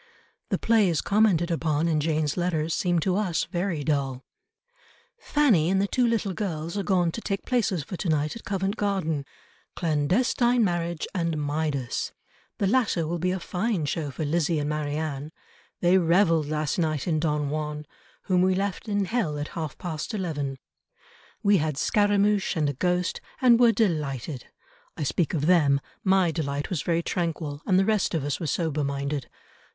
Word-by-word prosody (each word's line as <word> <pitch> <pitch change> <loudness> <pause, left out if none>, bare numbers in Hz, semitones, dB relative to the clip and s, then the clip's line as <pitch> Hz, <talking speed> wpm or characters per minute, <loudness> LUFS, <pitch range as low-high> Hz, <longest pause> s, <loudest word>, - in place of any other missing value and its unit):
The - - +1
plays 210 -8 +3
commented 195 -5 +2
upon 160 -1 0
in 160 -2 +2
Jane's 155 -1 0
letters 165 -3 0
seem 175 -2 +1
to 185 +2 +1
us 185 -6 0
very 175 -3 -2
dull, 135 -3 -1 0.9
"Fanny 230 - +3
and 190 +1 +2
the 200 - +2
two 245 +4 +1
little 220 -4 0
girls 170 -4 -3
are 205 - 0
gone 180 -4 +2
to 230 - -6
take 195 -3 -3
places 210 - 0
for 185 - -6
to 180 - -2
night 155 +2 0
at 230 - -9
Covent 195 +1 -2
Garden; 175 -8 -1 0.5
Clandestine 225 - +2
Marriage 175 -3 -1
and 170 -4 -1
Midas. 145 -3 -2 0.4
The 200 - 0
latter 205 -6 +2
will 170 +1 -2
be 180 +2 0
a 185 +1 -1
fine 185 -1 -1
show 150 0 -2
for 150 +3 -4
L[izzie] 160 +1 +1
and 145 +1 -1
M[arianne]. 150 -1 -3 0.5
They 180 +2 +5
revelled 165 -3 +3
last 155 +1 -1
night 155 -3 -1
in 160 -3 +1
Don 150 -2 0
Juan 150 0 -3 0.4
whom 180 -2 +2
we 185 0 +3
left 200 +3 -2
in 205 -1 +1
hell 190 -9 -1
at 145 +1 -4
half 155 -3 -5
past 165 +4 -4
eleven. 145 -8 -3 0.9
We 200 0 +5
had 155 -3 -1
Scaramouch 205 0 +2
and 150 -2 +2
a 145 - -1
ghost, 180 +5 0 0.2
and 240 -2 +5
were 240 -2 +6
delighted. 150 - -1 0.5
I - - -2
speak 165 +4 0
of 150 -2 0
them; 150 -6 +4 0.2
my 190 -3 +3
delight 145 -2 -3
was 170 -5 -1
very 170 0 0
tranquil, 160 -5 -3
and 185 -3 +4
the 190 - +4
rest 210 -4 +1
of 155 - -1
us 145 0 -2
were 165 - -3
sober 155 -1 -1
minded. 140 0 -3
170 Hz, 175 wpm, -26 LUFS, 150-195 Hz, 0.9 s, were